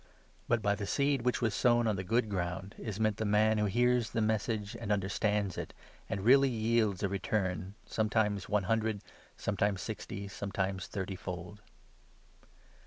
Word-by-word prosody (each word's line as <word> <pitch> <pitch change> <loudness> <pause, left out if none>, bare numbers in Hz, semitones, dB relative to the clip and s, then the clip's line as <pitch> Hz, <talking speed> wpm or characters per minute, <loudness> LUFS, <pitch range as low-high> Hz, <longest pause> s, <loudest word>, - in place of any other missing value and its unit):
But 120 -2 +1
by 100 -1 +3
the 100 -1 -4
seed 140 +2 +2
which 125 0 0
was 110 -3 +2
sown 120 +1 +3
on 110 -2 +2
the 95 - -2
23 90 - -14
good 110 - -10
ground 95 +2 -3
is 105 -2 -5
meant 110 -1 +1
the 110 - -1
man 105 +1 +3
who 105 - +2
hears 120 +2 +2
the - - -2
Message 110 0 -1
and 115 -3 -3
understands 100 0 0
it, - - -6 0.3
and 100 - -2
really 135 +3 +6
yields 110 -4 +1
a - - +3
return, 95 -1 -2
sometimes 105 -3 0
one 105 -2 +2
hun 115 +4 +2
dred, 110 -2 -2 0.4
sometimes 100 0 0
sixty, 100 0 -5
sometimes 95 -1 -3
thirty 95 -1 -4
fold. 90 +2 -7
105 Hz, 175 wpm, -32 LUFS, 100-110 Hz, 0.4 s, really